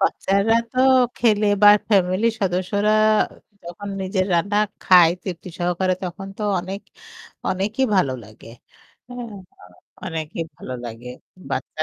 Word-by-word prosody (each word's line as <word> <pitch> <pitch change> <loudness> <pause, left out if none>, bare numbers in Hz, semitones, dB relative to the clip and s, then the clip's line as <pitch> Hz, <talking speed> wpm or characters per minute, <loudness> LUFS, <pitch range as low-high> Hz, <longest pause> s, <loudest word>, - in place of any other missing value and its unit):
বাচ্চারা 200 +4 +1 0.2
তো 255 - -5 0.4
খেলে 215 -3 +2 0.2
বা 205 - +9 0.2
ফ্যামিলির 195 +3 +2
সদস্যরা 195 +3 0 0.7
যখন 175 +4 -8
নিজের 190 0 -1
রান্না 200 +5 0 0.2
খায় 175 -3 +6
তৃপ্তি 180 -2 -7
সহকারে 180 +1 0
তখন 195 +2 -6
তো - - -4 0.2
অনেক 190 +3 -6 0.7
অনেকই 210 +7 0
ভালো 140 -8 +2
লাগে। 110 +1 -15 0.6
হ্যাঁ, 245 -3 -8 0.7
অনেকই 160 0 -4
ভালো 130 - -7
লাগে। 120 +1 -8 0.4
বাচ্চা 155 - -3
190 Hz, 115 wpm, -21 LUFS, 175-205 Hz, 0.7 s, বা